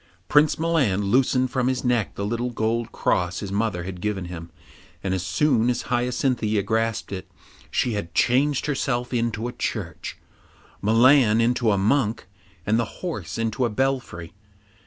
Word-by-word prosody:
Prince 150 0 +4
Milan 150 - +1
loosened 130 0 +2
from 130 -2 0
his 130 0 -1
neck 120 -4 +1
the 100 - -3
little 120 +3 -1
gold 115 0 -1
cross 90 0 0
his 100 - -5
mother 100 -4 -1
had 90 -1 -7
given 100 -3 -2
him, 85 -1 -8 0.5
and 95 - -1
as 95 -2 -1
soon 120 +2 +2
as 125 - -1
Hyacinthia 120 -3 0
grasped 110 +1 -1
it, 95 -1 -6 0.4
she 120 - 0
had 85 -5 -5
changed 135 +3 +2
herself 130 -4 -1
into 115 -1 -1
a - - -4
church, 85 -8 -4 0.6
Milan 115 +1 +5
into 120 0 +2
a 100 - +2
monk, 110 +2 +1 0.4
and 110 +2 +2
the 115 - -5
horse 100 - -4
into 115 +2 -1
a 120 - +2
belfry. 120 -8 -2
115 Hz, 155 wpm, -24 LUFS, 100-125 Hz, 0.6 s, Milan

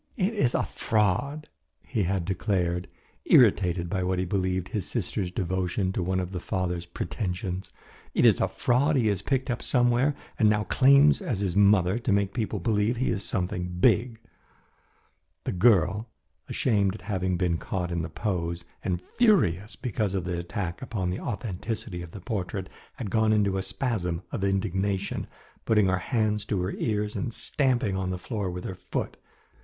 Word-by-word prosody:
"It 200 +1 +1
is 130 - +1
a - - +2
fraud," 115 +8 0 0.4
he 115 -5 -2
had 95 -1 -1
declared, 90 -2 -1 0.4
irritated 90 -7 +4
by 95 +2 -1
what 90 0 0
he 90 - 0
believed 95 0 -1
his 105 -6 -3
sister's 95 -3 -2
devotion 95 +1 -1
to - - -1
one 95 +1 0
of 90 0 -3
the 90 - -3
father's 90 -1 -2
pretensions. 90 +2 -4 0.4
"It - - +4
is - - +5
a - - +3
fraud 140 +5 +2
he 115 -5 +3
has 100 -3 0
picked 130 +4 0
up 120 - -3
somewhere 125 +3 +3 0.2
and 110 - +5
now 105 0 +2
claims 140 - +5
as 125 - -2
his 95 -3 -1
mother 100 0 +4
to 120 -2 -1
make 100 0 +2
people 110 -3 -2
believe 105 +4 +1
he 130 - +1
is 100 - -2
something 90 -3 -2
big." 115 +4 +3 1.2
The - - -2
girl, 105 +2 +3 0.4
ashamed 100 -6 +1
at - - -10
having 95 -3 -1
been 85 -2 0
caught 90 -2 -3
in 85 -1 -1
the 80 - -4
pose, 85 -2 -3 0.2
and 90 -4 -2 0.2
furious 110 - +3
because 105 -5 -2
of 95 - -1
the 90 -1 -2
attack 85 0 -4
upon 105 -8 -2
the 90 - -3
authenticity 105 -3 -4
of 85 - -8
the 100 +3 -10
portrait, 95 -2 -3 0.3
had 110 -7 -5
gone 110 0 +3
into 100 -2 +2
a 95 - 0
spasm 95 -4 -2
of - - -3
indignation, 95 0 -1 0.4
putting 105 -2 +3
her 95 -1 +2
hands 105 -4 0
to 100 -2 -1
her 95 - -1
ears 105 -2 -1
and 120 -4 -3
stamping 130 -7 0
on 95 -1 -2
the 90 - -2
floor 100 0 -3
with 90 0 -5
her - - -4 0.2
foot. - - -2
100 Hz, 175 wpm, -27 LUFS, 90-110 Hz, 1.2 s, is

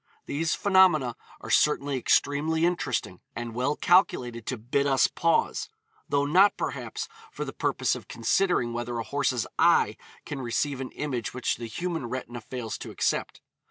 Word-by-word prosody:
These 160 +3 -1
phenomena 185 - +4 0.3
are - - -6
certainly 145 -2 +3
extremely 150 +5 +2
interesting, 175 0 -1
and 120 -1 -5
well 130 +5 0
calculated 125 - +2
to 130 - -2
'bid 130 +6 0
us 135 -1 +4
pause,' 165 0 +1 0.4
though 140 0 +2
not, 185 +8 +5
perhaps, - - -4 0.2
for - - -5
the - - -6
purpose - - 0
of - - -7
considering 175 -12 +1
whether 120 0 -3
a 115 - -2
horse's 135 -3 0
eye - - +4 0.3
can 140 -2 -5
receive 130 +3 -1
an 130 - -4
image 125 -6 -3
which 125 - -1
the 115 - -6
human 165 +1 -3
retina 120 -1 -5
fails 115 0 -5
to - - -7
accept. - - -1
135 Hz, 160 wpm, -27 LUFS, 120-160 Hz, 0.4 s, not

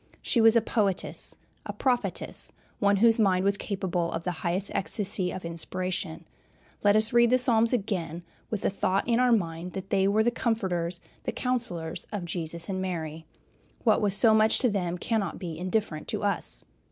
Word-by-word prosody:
She 235 - +3
was 225 0 +7
a 230 - +5
poetess, 205 -4 -1 0.3
a - - -6
prophetess, 250 -2 -1 0.3
one 200 -1 +3
whose 225 +3 +4
mind 190 -3 +3
was 200 0 +3
capable 185 -4 -2
of 165 - -3
the 180 - -1
highest 180 +4 0
ecstasy 195 -2 -1
of 185 -1 -6
inspiration. 170 0 -3 0.6
Let 205 0 +5
us 215 +2 +2
read 235 0 +5
the 255 - +5
Psalms 230 -3 +4
again, 180 -8 -2 0.3
with 215 - -3
the - - 0
thought 195 +1 0
in 235 0 +2
our 250 -1 +4
mind 175 -4 -1
that 190 0 -7
they 195 0 +3
were 210 +2 +3
the 240 - +2
comforters, 185 -8 -1 0.3
the - - -1
counselors 230 -11 -3
of 205 -5 -4
Jesus 170 -1 -4
and 185 -1 -2
Mary. 160 -4 -4 0.6
What 220 -3 +3
was 200 -2 +2
so 220 +1 +5
much 220 0 +5
to 250 -4 +3
them 180 -3 -1
cannot 205 0 -1
be 170 -4 -6
indifferent 185 -4 -2
to - - -3
us. - - +1
195 Hz, 180 wpm, -27 LUFS, 175-220 Hz, 0.6 s, was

